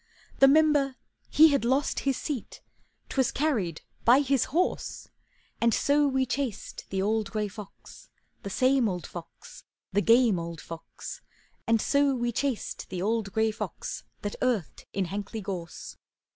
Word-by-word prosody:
The 270 - +8
Member 290 -2 +4 0.3
he 315 +1 +7
had 280 -4 +1
lost 265 +4 +1
his 270 - 0
seat, 285 -7 -5 0.5
'Twas 265 -2 +1
carried 225 - 0 0.2
by 250 +4 +6
his 275 -3 +2
horse; 355 +6 -1 0.5
And 230 -1 +4
so 290 +1 +3
we 265 -1 +1
chased 260 -4 -4
the 190 -1 -1
old 215 0 0
gray 210 0 -1
fox, 205 -1 -12 0.3
The 200 - -6
same 255 +2 +3
old 180 -3 -4
fox, 170 -2 -11 0.3
The 205 - +3
game 230 -4 +5
old 170 -1 -6
fox; 165 +1 -9 0.5
And 230 0 +4
so 280 +3 +2
we 240 -1 -1
chased 260 0 -3
the 185 - -4
old 215 -1 0
gray 220 +2 +2
fox 210 -5 -5 0.2
That 205 - -3
earthed 240 -10 -1
in 195 -1 -1
Hankley 205 +3 -5
Gorse. 180 -4 -6
230 Hz, 150 wpm, -28 LUFS, 200-275 Hz, 0.5 s, The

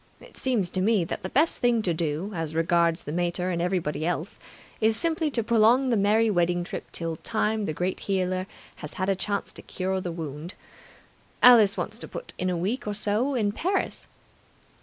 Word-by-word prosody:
It - - -16
seems 225 -9 0
to 185 - -1
me 205 -1 +3
that 165 - -4
the 185 - -5
best 310 - +2
thing 240 -2 +2
to 175 - +1
do, 160 +4 -2
as 165 -3 -4
regards 170 0 +2
the 150 - -6
mater 175 +2 -1
and 170 -1 -1
everybody 175 -4 -1
else, 175 +2 -2 0.4
is 220 0 +3
simply 320 +3 0
to 240 -5 -1
prolong 235 +4 +4
the - - +3
merry 215 +2 +3
wedding 175 -1 +1
trip - - -7
till 165 -1 -3
Time 220 +1 -1
the 155 - -2
Great 180 +4 -2
Healer 185 -1 -1 0.3
has 150 - -8
had 185 +1 -2
a 195 - +2
chance 200 +1 -3
to - - -9
cure 190 0 -3
the 180 - -4
wound. 160 +1 -6 0.9
Alice 225 -4 +7
wants 220 +2 -4
to - - -5
put - - -8
in 185 - 0
a 180 - -1
week 205 +8 -2
or 205 - -2
so 215 +7 0
in 210 -4 +1
Paris. 375 - -2
190 Hz, 200 wpm, -26 LUFS, 175-220 Hz, 0.9 s, Alice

